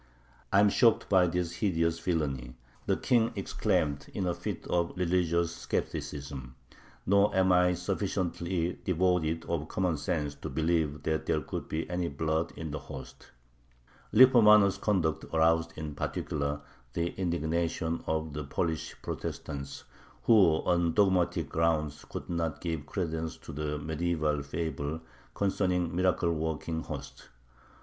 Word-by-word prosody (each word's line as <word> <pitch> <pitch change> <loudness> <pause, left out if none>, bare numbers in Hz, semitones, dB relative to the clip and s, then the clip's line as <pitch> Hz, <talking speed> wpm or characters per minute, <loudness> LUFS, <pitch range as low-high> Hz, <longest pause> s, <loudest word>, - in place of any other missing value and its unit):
"I 100 - +5
am 105 - +6
shocked 115 +1 +3
by 95 -2 +5
this 85 0 -2
hideous 85 -5 +1
villainy," 70 -8 -2 0.3
the - - +2
King 115 -2 +2
exclaimed 70 -2 0
in 95 - -1
a 90 - +1
fit - - -5
of 85 -1 0
religious 85 -2 +1
skepticism, 70 -3 -4 0.5
"nor 100 +1 +4
am 95 -1 +4
I 90 0 +4
sufficiently 90 -2 -2
devoid 85 -2 +1
of 80 -2 -2
common 90 -4 0
sense 75 0 -2
to - - -7
believe 80 0 0
that 80 0 -1
there - - +1
could - - -5
be 80 +1 -3
any 90 0 -1
blood 80 +2 -1
in 80 -2 -5
the 75 - -3
host." - - -10 0.8
Lippomano's 105 -5 +7
conduct 90 -7 0
aroused 80 0 +3
in 75 -1 -5
particular 70 0 -2 0.3
the 85 0 0
indignation 85 -1 -1
of 80 -1 -1
the 75 +1 -4
Polish 80 +3 -2
Protestants, 70 -1 -5 0.4
who 95 -9 +5
on 85 -2 +2
dogmatic 95 -4 +2
grounds 80 -2 0
could - - -6
not 85 -3 -2
give 80 -4 -4
credence 80 -3 -3
to - - -10
the 75 0 -2
medieval 80 -1 -1
fable 80 +1 -3 0.3
concerning 90 -3 0
miracle 90 -2 +2
working 80 0 -2
hosts. - - -8
85 Hz, 135 wpm, -30 LUFS, 80-90 Hz, 0.8 s, Lippomano's